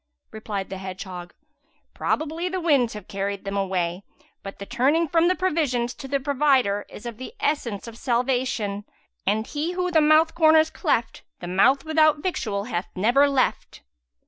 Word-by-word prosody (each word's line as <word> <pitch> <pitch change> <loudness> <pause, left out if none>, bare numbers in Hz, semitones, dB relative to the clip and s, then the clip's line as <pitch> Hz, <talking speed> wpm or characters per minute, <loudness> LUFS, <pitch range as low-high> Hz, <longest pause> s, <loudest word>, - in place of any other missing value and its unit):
Replied 210 -3 -5
the 190 - -5
hedgehog, 185 -2 -7 0.6
"Probably 320 +3 -2
the 370 +1 -2
winds 280 -9 +2
have 210 -3 -9
carried 200 0 -3
them 195 0 -3
away; 185 -2 -1 0.4
but 195 -1 -8
the 200 - -7
turning 275 +9 +2
from 330 +2 +3
the 365 - +3
provisions 290 -10 0
to 270 - -9
the 280 +1 0
Provider 265 -7 +1
is 220 - -11
of 235 -2 -6
the 260 - -9
essence 250 - -2
of 230 0 -10
salvation, 245 -5 -1 0.4
and 215 +2 +1
He 310 +7 -3
who 360 0 -1
the 320 -2 +4
mouth 310 +2 +4
corners 315 -1 +5
cleft, 240 -9 -1 0.2
the - - -7
mouth 230 - +3
without 310 -1 +4
victual 210 - -2
hath 190 -5 -3
never 245 +9 +4
left." 270 -2 -1
250 Hz, 165 wpm, -24 LUFS, 200-310 Hz, 0.6 s, corners